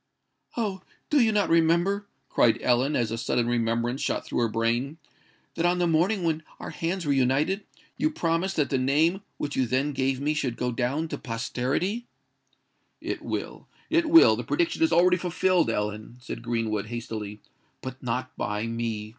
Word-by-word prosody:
"Oh! 200 Hz, -5 st, -2 dB, 0.3 s
do 295 Hz, -, +5 dB
you 225 Hz, -2 st, +4 dB
not 205 Hz, -2 st, +2 dB
remember," 170 Hz, +5 st, +3 dB, 0.2 s
cried 115 Hz, -, +3 dB
Ellen, 130 Hz, +4 st, +2 dB
as 115 Hz, -3 st, 0 dB
a 115 Hz, -, -3 dB
sudden 120 Hz, 0 st, 0 dB
reminiscence 120 Hz, +2 st, 0 dB
shot -, -, -1 dB
through -, -, -2 dB
her 120 Hz, -, +3 dB
brain, 115 Hz, +6 st, -1 dB, 0.6 s
"that 165 Hz, -, -2 dB
on 175 Hz, +1 st, +3 dB
the 175 Hz, -, +2 dB
morning 175 Hz, +4 st, +2 dB
when 160 Hz, -1 st, 0 dB, 0.2 s
our -, -, -6 dB
hands 170 Hz, +1 st, -3 dB
were 145 Hz, -, +2 dB
united, 140 Hz, +10 st, +1 dB, 0.3 s
you 305 Hz, -, +2 dB
promised 175 Hz, -, -1 dB
that 150 Hz, -, 0 dB
the 135 Hz, -, +2 dB
name 155 Hz, +8 st, +2 dB, 0.2 s
which 145 Hz, -1 st, -3 dB
you 130 Hz, -2 st, +1 dB
then 130 Hz, +4 st, 0 dB
gave 135 Hz, -1 st, 0 dB
me 150 Hz, +2 st, 0 dB
should 130 Hz, -6 st, -2 dB
go 125 Hz, +1 st, -1 dB
down 130 Hz, +7 st, -1 dB
to -, -, -5 dB
posterity?" 130 Hz, -, -2 dB, 0.9 s
"It -, -, -4 dB
will—it 335 Hz, -1 st, -3 dB
will: 330 Hz, +1 st, +8 dB
the -, -, -4 dB
prediction 335 Hz, -1 st, 0 dB
is 325 Hz, -, +4 dB
already 180 Hz, +1 st, +5 dB
fulfilled, 180 Hz, 0 st, +1 dB
Ellen," 105 Hz, +3 st, -3 dB
said 125 Hz, -2 st, -7 dB
Greenwood, 115 Hz, -3 st, -2 dB
hastily;—"but 110 Hz, +3 st, -8 dB
not 125 Hz, +1 st, -3 dB
by 105 Hz, +1 st, -2 dB
me!" 115 Hz, -2 st, -3 dB
135 Hz, 170 wpm, -26 LUFS, 120-175 Hz, 0.9 s, will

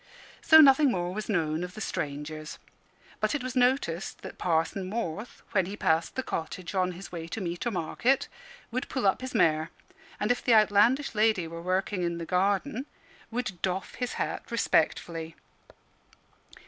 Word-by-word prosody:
So 315 Hz, -1 st, +8 dB
nothing 280 Hz, 0 st, +7 dB
more 175 Hz, -2 st, -2 dB
was 215 Hz, +3 st, -5 dB
known 160 Hz, -4 st, 0 dB
of 180 Hz, 0 st, -7 dB
the -, -, -7 dB
strangers. 150 Hz, -3 st, -4 dB, 0.6 s
But -, -, +1 dB
it 285 Hz, -, -2 dB
was 255 Hz, 0 st, -4 dB
noticed 245 Hz, -9 st, +1 dB
that -, -, -9 dB
Parson 180 Hz, +2 st, 0 dB
Morth, 210 Hz, 0 st, -4 dB
when 190 Hz, -4 st, +2 dB
he 205 Hz, +2 st, -6 dB
passed 160 Hz, -3 st, +1 dB
the 265 Hz, -, -1 dB
cottage 170 Hz, +1 st, -5 dB
on 185 Hz, -1 st, +1 dB
his 185 Hz, +3 st, -10 dB
way 165 Hz, -2 st, -6 dB
to 170 Hz, -, -5 dB
meet 175 Hz, +5 st, -3 dB
or -, -, +3 dB
market, 235 Hz, +7 st, 0 dB, 0.4 s
would 255 Hz, +3 st, -3 dB
pull 260 Hz, -5 st, -2 dB
up 195 Hz, -, +3 dB
his 260 Hz, -1 st, -6 dB
mare, 160 Hz, -5 st, +3 dB, 0.5 s
and, 210 Hz, +3 st, +1 dB
if 245 Hz, -, -1 dB
the 240 Hz, -, +5 dB
outlandish 215 Hz, +6 st, +4 dB
lady 215 Hz, -5 st, +2 dB
were 165 Hz, +1 st, -7 dB
working 185 Hz, +2 st, -1 dB
in 170 Hz, -1 st, -1 dB
the 170 Hz, -, -5 dB
garden, 200 Hz, -, 0 dB, 0.4 s
would 235 Hz, -7 st, -4 dB
doff 190 Hz, 0 st, -2 dB
his 250 Hz, -1 st, -3 dB
hat -, -, -3 dB
respectfully. 165 Hz, -1 st, 0 dB
190 Hz, 170 wpm, -28 LUFS, 170-240 Hz, 0.6 s, So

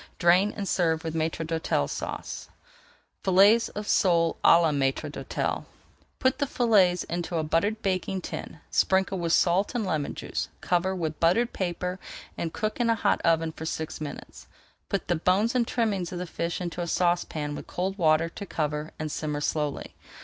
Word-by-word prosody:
Drain 180 Hz, +4 st, +4 dB
and 200 Hz, -2 st, -3 dB
serve 165 Hz, -3 st, +1 dB
with 160 Hz, -1 st, -3 dB
Maître 160 Hz, 0 st, -1 dB
d'Hôtel 160 Hz, -, 0 dB
Sauce. -, -, -5 dB, 0.7 s
[Page -, -, -19 dB
388] 190 Hz, +2 st, +7 dB
FILLETS 230 Hz, +1 st, +3 dB
OF 210 Hz, 0 st, -4 dB
SOLE 170 Hz, -3 st, +3 dB
À 170 Hz, -, +7 dB
LA 160 Hz, -, +3 dB
MAÎTRE 135 Hz, -2 st, 0 dB
D'HÔTEL -, -, -3 dB, 0.5 s
Put 260 Hz, +1 st, +1 dB
the 285 Hz, -, +1 dB
fillets 200 Hz, -9 st, +3 dB
into 170 Hz, 0 st, -3 dB
a 160 Hz, -, 0 dB
buttered 200 Hz, +8 st, 0 dB
baking 190 Hz, 0 st, -1 dB
tin, -, -, -7 dB
sprinkle 190 Hz, 0 st, +2 dB
with 170 Hz, -1 st, -1 dB
salt 185 Hz, +8 st, +3 dB
and 230 Hz, -4 st, 0 dB
lemon 155 Hz, -6 st, -2 dB
juice, -, -, -4 dB
cover 185 Hz, +2 st, 0 dB
with 160 Hz, -4 st, -3 dB
buttered 205 Hz, +9 st, +3 dB
paper, 180 Hz, 0 st, -3 dB, 0.4 s
and 165 Hz, -, -3 dB
cook 215 Hz, +5 st, -3 dB
in 240 Hz, -1 st, +2 dB
a 230 Hz, -, +4 dB
hot 220 Hz, -, +1 dB
oven 165 Hz, -1 st, +2 dB
for 160 Hz, 0 st, -7 dB
six 160 Hz, -1 st, -4 dB
minutes. 150 Hz, -2 st, -8 dB, 0.4 s
Put 200 Hz, -, -2 dB
the 175 Hz, -, +2 dB
bones 190 Hz, +7 st, +2 dB
and 245 Hz, -2 st, +1 dB
trimmings 205 Hz, -9 st, -1 dB
of 180 Hz, -, -4 dB
the 180 Hz, -, -3 dB
fish 170 Hz, 0 st, -3 dB
into 175 Hz, -1 st, -4 dB
a 170 Hz, -, -2 dB
saucepan 170 Hz, -4 st, 0 dB
with -, -, -7 dB
cold 190 Hz, +2 st, -3 dB
water 160 Hz, 0 st, +4 dB
to 200 Hz, +4 st, -8 dB
cover 150 Hz, -1 st, -2 dB
and 155 Hz, -1 st, -4 dB
simmer 150 Hz, -1 st, -2 dB
slowly. 150 Hz, -1 st, -2 dB
175 Hz, 185 wpm, -27 LUFS, 160-195 Hz, 0.7 s, 388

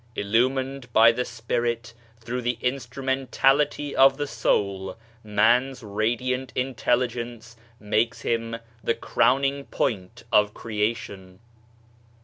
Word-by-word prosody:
Illumined 130 Hz, +4 st, 0 dB
by 115 Hz, +1 st, +7 dB
the 125 Hz, +2 st, -2 dB
spirit 120 Hz, 0 st, -3 dB, 0.3 s
through 120 Hz, +2 st, -4 dB
the 120 Hz, 0 st, -1 dB
instrumentality 135 Hz, +3 st, 0 dB
of 135 Hz, 0 st, +6 dB
the 145 Hz, -, -1 dB
soul, 100 Hz, -7 st, -1 dB, 0.3 s
Man's 120 Hz, +5 st, +2 dB
radiant 120 Hz, +5 st, -1 dB
intelligence 120 Hz, -2 st, -2 dB, 0.2 s
makes 110 Hz, +2 st, 0 dB
him 115 Hz, 0 st, -1 dB, 0.3 s
the 115 Hz, -, +1 dB
crowning 140 Hz, +1 st, +1 dB
point 100 Hz, -3 st, -3 dB
of 105 Hz, 0 st, +3 dB
Creation. 105 Hz, -4 st, -3 dB
120 Hz, 100 wpm, -25 LUFS, 110-130 Hz, 0.3 s, by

